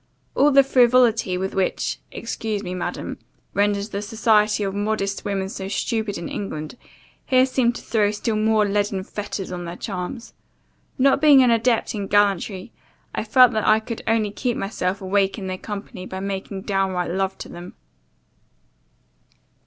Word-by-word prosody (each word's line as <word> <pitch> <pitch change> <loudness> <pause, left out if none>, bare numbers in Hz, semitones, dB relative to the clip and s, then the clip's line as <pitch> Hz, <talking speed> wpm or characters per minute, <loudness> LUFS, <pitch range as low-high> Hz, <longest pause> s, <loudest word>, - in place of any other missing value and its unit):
All 285 - +4
the 275 0 +7
frivolity 240 -7 +3
which 190 +1 -2
often 190 -1 -1
(excuse 220 -3 -4
me, 180 - -4
Madam) 180 - -4 0.3
renders 205 +1 +1
the 200 -1 -4
society 215 -1 +2
of 195 -1 -2
modest 205 -1 -2
women 195 -2 -2
so 190 -1 -6
stupid 220 0 -2
in 170 - -5
England, 155 -5 -5 0.5
here 255 0 +4
seemed 250 -2 +1
to - - -8
throw 210 -3 +1
still 215 +1 -2
more 215 0 +2
leaden 200 -1 0
fetters 205 -1 -5
on 175 -1 -5
their 170 +1 -6
charms. 195 +5 -6 0.6
Not 275 +1 +3
being 290 -4 +7
an 245 - +4
adept 230 0 +1
in 200 -3 -4
gallantry, 200 -1 +1 0.4
I - - -2
found 250 +1 +5
that 215 - 0
I 215 0 +5
could 225 +1 -6
only 220 -2 +1
keep 240 +3 -2
myself 195 -1 -2
awake 195 +1 +1
in 200 - -6
their 185 0 -4
company 200 -2 -7
by 190 - -6
making 195 0 -5
downright 190 -4 -1
love 190 +1 -1
to - - -8
them. 175 +1 -10
205 Hz, 160 wpm, -22 LUFS, 190-225 Hz, 0.6 s, the